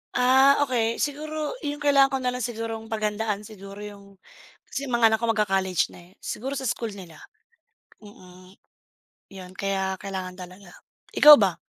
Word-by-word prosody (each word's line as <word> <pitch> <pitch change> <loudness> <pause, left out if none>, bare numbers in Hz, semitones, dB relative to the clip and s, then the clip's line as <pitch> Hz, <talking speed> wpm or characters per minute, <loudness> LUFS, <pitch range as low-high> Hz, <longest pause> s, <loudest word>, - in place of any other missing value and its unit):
Ah, 265 +3 +5
okey. 235 -4 0
Siguro 305 +1 -3
'yung 290 0 -4
kailangan 275 -1 +4
ko - - +1
na 250 - 0
lang 250 0 -4
sigurong 225 -1 -5
paghandaan 215 -1 -2
siguro 200 -1 -11
yung 200 -1 -12 0.5
kasi 275 - -5
yung 250 - -1
mga 230 - +6
anak 220 - +1
ko 235 - -2
magka-college 195 -4 0
na, 175 +1 -16
eh. - - -24
Siguro 270 +5 -5
sa 265 -1 -3
school 230 0 -3
nila, 170 -5 -12 0.8
mm, 185 -3 -16 0.8
'yon, 185 -2 -11
kaya 190 0 -2
kailangan 190 -2 -6
talaga. 185 +1 -12 0.4
Ikaw 300 0 +10
ba? 195 -5 +1
215 Hz, 160 wpm, -25 LUFS, 195-250 Hz, 0.8 s, Ikaw